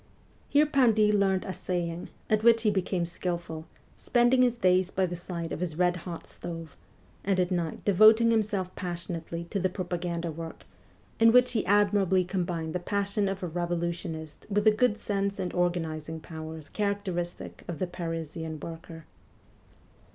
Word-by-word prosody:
Here 295 +1 +5
Pindy 230 -8 +4
learned 195 -2 +2
assay 180 -2 -2
ing, 170 +1 -6 0.2
at 215 -1 +2
which 230 0 +5
he 215 - +4
became 185 -2 0
skilful; 170 -2 -4 0.3
spending 245 +1 +3
his 245 -1 +3
days 185 -3 +3
by 190 -1 +1
the 175 -1 -4
side 170 -1 -5
of - - -4
his 170 -3 -3
red 180 0 +3
hot 170 -1 -7
stove, 165 -3 -8 0.5
and 195 -1 +1
at 180 0 +1
night 170 -3 -2
devoting 220 +4 +6
himself 205 -4 0
passionately 170 -2 -5
to 200 +4 -3
propaganda 175 -2 -3
work, 165 +1 -8 0.6
in 225 0 +7
which 250 +1 +5
he 225 - +1
admirably 200 -2 +3
combined 175 -3 -2
the 180 - -1
passion 200 +2 0
of 195 -1 -4
a - - -1
revolutionist 170 -2 -3
with 205 0 +1
the 215 - +7
good 215 0 +2
sense 200 -1 -1
and 185 -2 -3
organizing 160 -3 -1
powers 160 -1 -8
characteristic 200 -4 -3
of 170 - -4
the 185 - -1
Parisian 165 -2 -5
worker. 165 0 -9
180 Hz, 155 wpm, -28 LUFS, 170-205 Hz, 0.6 s, in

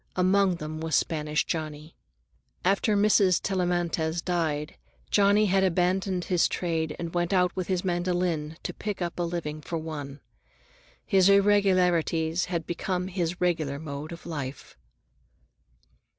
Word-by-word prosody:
Among 185 0 +3
them 155 -1 -6
was 160 0 -1
Spanish 150 -1 0
Johnny. 155 -1 -5 0.7
After 200 +2 +2
Mrs. 200 -3 +4
Tellamantez 175 -3 -1
died, 160 -4 -1 0.4
Johnny 205 -1 +4
abandoned 185 0 +1
his 180 -2 +2
trade 160 -3 -2
and 170 -1 -5
went 175 0 0
out 180 -2 +2
with 185 -2 -3
his 185 -1 -1
mandolin 175 -3 -1
to - - -4
pick 205 -3 -4
up 175 -1 -4
a - - +1
living 165 -3 -3
for 165 +3 -4
one. 150 -3 -6 0.9
His 195 -2 +4
irregularities 180 -5 +3
had 170 -3 -3
become 180 +1 -2
his 180 -2 -2
regular 160 -6 0
mode 145 0 -6
of 170 - -9
life. 145 -5 -6
175 Hz, 130 wpm, -27 LUFS, 160-185 Hz, 0.9 s, Mrs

